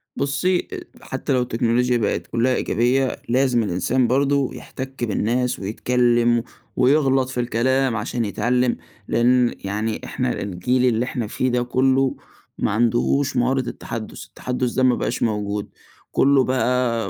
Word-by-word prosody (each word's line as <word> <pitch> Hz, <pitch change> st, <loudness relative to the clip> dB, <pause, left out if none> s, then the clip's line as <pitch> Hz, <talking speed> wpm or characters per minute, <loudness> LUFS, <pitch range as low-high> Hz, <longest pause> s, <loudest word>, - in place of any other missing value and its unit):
بُصي 155 Hz, +6 st, 0 dB
أ -, -, -4 dB, 0.3 s
حتى -, -, -2 dB
لو 130 Hz, -, +2 dB
التكنولوچيا 120 Hz, +1 st, +1 dB
بقِت 110 Hz, -3 st, -1 dB
كلها 125 Hz, +2 st, +1 dB
إيجابية، 125 Hz, +3 st, 0 dB
لازم 125 Hz, -1 st, +2 dB
الإنسان 110 Hz, +7 st, +1 dB
برضه 140 Hz, +2 st, +2 dB
يحتَك 130 Hz, -1 st, -7 dB
بالناس، 120 Hz, +3 st, 0 dB
ويتكلّم، 120 Hz, +3 st, +1 dB, 0.3 s
ويغلط 135 Hz, -1 st, +3 dB
في 130 Hz, -, -4 dB
الكلام 125 Hz, +1 st, +1 dB
عشان 115 Hz, +2 st, -2 dB
يتعلّم، 120 Hz, +4 st, 0 dB, 0.3 s
لأن 120 Hz, +1 st, +3 dB
يعني 105 Hz, +3 st, -2 dB
إحنا 125 Hz, -1 st, -2 dB
الجيل 105 Hz, +7 st, 0 dB
اللي 120 Hz, -1 st, +2 dB
إحنا 120 Hz, -3 st, -3 dB
فيه 130 Hz, +4 st, -1 dB
ده 125 Hz, 0 st, +1 dB
كله، 130 Hz, +2 st, +2 dB, 0.4 s
ما -, -, 0 dB
عندهوش 120 Hz, +5 st, +1 dB
مهارة 130 Hz, +2 st, +2 dB
التحدُّث، 115 Hz, -2 st, -7 dB
التحدُّث 125 Hz, -1 st, -3 dB
ده 130 Hz, -, 0 dB
ما 125 Hz, -1 st, +4 dB
بَقاش -, -, -2 dB
موجود. 105 Hz, -2 st, -2 dB, 0.4 s
كله 140 Hz, -1 st, +4 dB
بقى 125 Hz, -4 st, 0 dB
125 Hz, 135 wpm, -22 LUFS, 115-130 Hz, 0.4 s, ما